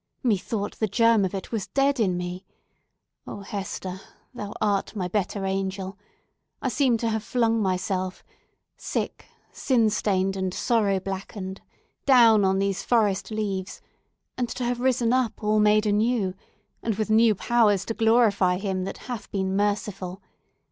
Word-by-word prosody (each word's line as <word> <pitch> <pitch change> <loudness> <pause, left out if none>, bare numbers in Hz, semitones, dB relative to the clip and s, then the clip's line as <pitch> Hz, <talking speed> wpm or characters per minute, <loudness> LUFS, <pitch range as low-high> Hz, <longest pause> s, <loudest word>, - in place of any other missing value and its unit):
"Methought 205 -2 -1
the 220 - +1
germ 230 +1 +4
of 190 - -3
it 190 - -6
was 220 -4 -2
dead 275 -1 +1
in 185 -5 +1
me! 180 +1 -5 0.8
Oh, 205 - -7
Hester, 190 -1 -5 0.3
thou 210 -4 -6
art 205 0 0
my 185 -3 -2
better 195 +1 -2
angel! 190 0 -3 0.6
I 260 - -1
seem 250 0 +2
to 230 0 -1
have 220 0 -1
flung 230 0 +1
myself—sick, 185 -1 -4 0.2
sin 230 -5 +2
stained, 195 -2 0
and 190 -1 -2
sorrow 205 -5 +1
blackened—down 200 +4 +1
upon 190 0 +2
these 195 -1 0
forest 210 -5 +1
leaves, 205 -3 -3 0.6
and 245 -2 0
to 250 - -4
have 240 0 -1
risen 245 -2 +2
up 255 -3 0
all 215 0 +2
made 210 0 +4
anew, 210 -2 +1 0.5
and 225 -2 -1
with 215 +1 -2
new 220 0 +5
powers 210 -3 +2
to 225 - -2
glorify 220 -5 +3
Him 190 -1 -2
that 195 - -5
hath 245 -4 -6
been 190 -1 -1
merciful! 200 -2 -1
205 Hz, 145 wpm, -25 LUFS, 190-230 Hz, 0.8 s, new